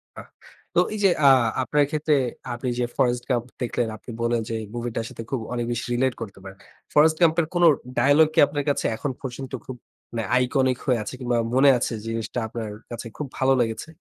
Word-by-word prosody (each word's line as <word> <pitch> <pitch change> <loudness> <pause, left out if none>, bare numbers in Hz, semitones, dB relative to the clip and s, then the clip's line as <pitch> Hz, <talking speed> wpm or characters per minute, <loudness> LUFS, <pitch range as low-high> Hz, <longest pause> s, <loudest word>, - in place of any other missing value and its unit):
বাহ! - - -10 0.5
তো - - +5
এই 215 - -4
যে 195 - +6 0.2
আ - - +10 0.3
আপনার 145 +3 +2
ক্ষেত্রে 155 -1 +1 0.4
আপনি 125 +2 -3
যে 120 - +2
ফরেস্ট 120 -1 +2
গাম্প 120 -2 +1 0.2
দেখলেন, 120 -1 -1
আপনি 120 - -10
বললেন 115 0 +1
যে 115 - -2 0.2
মুভি 120 0 -3
টার 115 - -2
সাথে 115 - -8
খুব 135 - 0
অনেক 120 -1 -1
বেশি 120 - -2
রিলেট 130 +1 +1
করতে 100 -3 -7
পারেন। 95 0 -10 0.4
ফরেস্ট 155 +1 +5
ক্যাম্প 165 -1 +5
এর 160 - -3
কোন 175 - +3 0.3
ডায়ালগ 145 +3 +5
কি - - +2
আপনার 145 -1 -3
কাছে 140 - 0
এখন 140 - -2
পর্যন্ত 130 0 -6
খুব 130 - -6 0.4
মানে 115 -1 -2
আইকনিক 130 0 +2
হয়ে 125 -4 +2
আছে? 105 - -6
কিংবা 120 -2 0 0.2
মনে 135 +2 +6
আছে 120 - -2
জিনিসটা 115 +1 -3
আপনার 110 -1 -5 0.2
কাছে 120 0 -6
খুব 150 - -4
ভালো 135 0 +3
লেগেছে? 115 +5 -3
125 Hz, 205 wpm, -24 LUFS, 115-145 Hz, 0.5 s, আ